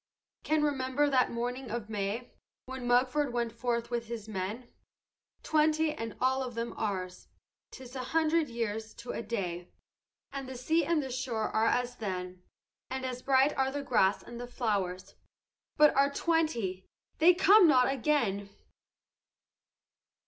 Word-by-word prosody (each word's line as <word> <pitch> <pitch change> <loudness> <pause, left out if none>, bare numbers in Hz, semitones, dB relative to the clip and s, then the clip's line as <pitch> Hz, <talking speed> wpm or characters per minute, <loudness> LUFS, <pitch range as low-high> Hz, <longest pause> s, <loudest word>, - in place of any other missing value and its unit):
"Can 310 -1 +1
remember 285 0 +1
that 255 -2 +3
morning 245 +2 -3
of 230 -1 -4
May, 210 +3 -3 0.3
When 260 -1 -6
Mugford 255 +3 +2
went 235 -1 -1
forth 235 +1 -2
with 235 -1 -2
his 225 -2 -6
men, 215 +4 -4 0.8
Twenty, 310 0 +2
and 225 -7 -6
all 260 +1 +2
of 250 -2 -5
them 230 0 -3
ours. 185 -3 -4 0.4
'Tis 260 0 -11
a 255 -1 -4
hundred 320 +1 +1
years 220 -2 -4
to 240 - -7
a - - -4
day, 180 -6 -4 0.6
And 275 -1 -6
the 260 - -6
sea 320 +7 +1
and 330 -2 +1
the 265 - -5
shore 245 -4 -2
are 220 +1 +2
as 245 +1 0
then, 185 -3 -5 0.5
And 260 0 -3
as 250 -1 -4
bright 270 +2 +3
are 265 0 +1
the 285 +1 -4
grass 205 -7 +2
and 240 0 -9
the 245 - -6
flowers; 200 -6 -2 0.6
But 300 0 +6
our 280 +1 +4
twenty 280 - 0 0.3
they 340 +3 +7
come 390 +1 +7
not 255 -4 +5
again! 230 -8 0
245 Hz, 150 wpm, -30 LUFS, 220-275 Hz, 0.8 s, they